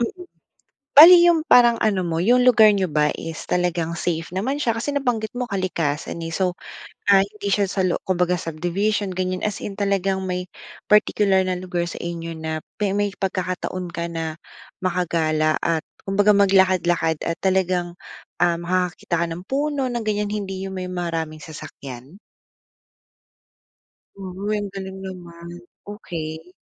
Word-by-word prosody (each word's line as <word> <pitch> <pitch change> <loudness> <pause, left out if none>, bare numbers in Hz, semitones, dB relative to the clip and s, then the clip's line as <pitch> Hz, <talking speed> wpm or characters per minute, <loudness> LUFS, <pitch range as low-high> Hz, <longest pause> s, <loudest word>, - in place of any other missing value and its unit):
mm, 360 +10 -3 0.7
bale 330 +5 +11
yung 345 -2 +5
parang 240 -1 +6
ano 195 -4 +1
mo, 165 0 -1
yung 245 +5 +4
lugar 220 -3 +7
niyo 195 -2 +2
ba 150 -2 +1
is 165 -1 -6
talagang 170 -2 -1
safe 165 -1 -2
naman 250 - -2
siya, 230 -4 0
kasi 285 +5 -2
nabanggit 245 -5 -1
mo 250 0 -4
kalikasan, 170 -5 -2
eh, 165 - -4
so, 180 +2 0 0.5
ah, 195 -1 +6
hindi 205 0 -7
siya 200 -1 +1
sa 190 -2 +1
lo 175 - +1
kumbaga 180 -1 +1
subdivision 180 +5 -2
ganiyan, 185 +2 -1
as 210 - -5
in 200 0 -6
talagang 195 -1 0
may 180 0 -2 0.5
particular 205 -2 +4
na 185 - 0
lugar 180 -1 -3
sa - - -7
inyo 165 -1 -5
na 160 0 -4 0.2
pe 205 -2 -1
may 205 -1 -1
pagkakataon 185 -1 -3
ka 170 0 -3
na 160 -1 -4 0.5
makagala 160 -4 +1
at 165 -2 0 0.2
kumbaga 205 +1 +3
maglakad-lakad 185 -4 +3
at 165 - -3
talagang, 185 -2 0 0.5
ah, 170 -1 +2
makakakita 175 -1 -1
ka - - +1
ng 170 +2 -6
puno 280 -1 -1
ng 240 -2 -3
ganiyan, 210 -1 -1
hindi 195 -2 -4
yung 190 - -7
may 185 0 -5
maraming 165 -3 -3
sasakyan? 140 0 -10 2.2
Uy, 210 +1 -1
ang 205 -1 -5
galing 190 -1 -6
naman. 170 -2 -9 0.4
Okey. 165 -3 -7
185 Hz, 150 wpm, -22 LUFS, 170-205 Hz, 2.2 s, bale